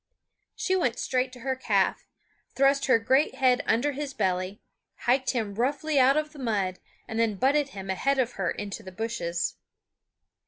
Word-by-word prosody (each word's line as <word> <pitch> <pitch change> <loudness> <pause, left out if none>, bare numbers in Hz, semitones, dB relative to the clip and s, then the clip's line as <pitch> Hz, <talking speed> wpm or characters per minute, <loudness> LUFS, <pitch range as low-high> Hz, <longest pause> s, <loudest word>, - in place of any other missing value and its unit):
She 375 - 0
went 250 -10 +1
straight 255 0 0
to 250 - -11
her 265 +1 -1
calf, 260 - 0 0.5
thrust 275 +1 +3
her 255 - +6
great 260 +6 +2
head 255 -2 +3
under 265 +6 +2
his 280 0 -5
belly, 185 -1 -1 0.5
hiked 260 +2 +2
him 220 -5 -1
roughly 280 +6 0
out 265 +3 +5
of 305 0 -1
the 295 - -12
mud, 200 -7 -1 0.3
and 225 - -3
then 225 -2 +2
butted 280 +6 +2
him 190 0 -4
ahead 275 +9 +1
of 250 -2 +1
her 190 -3 -2
into 205 +1 -5
the 190 -3 -10
bushes. 175 -5 -3
250 Hz, 170 wpm, -27 LUFS, 205-275 Hz, 0.5 s, her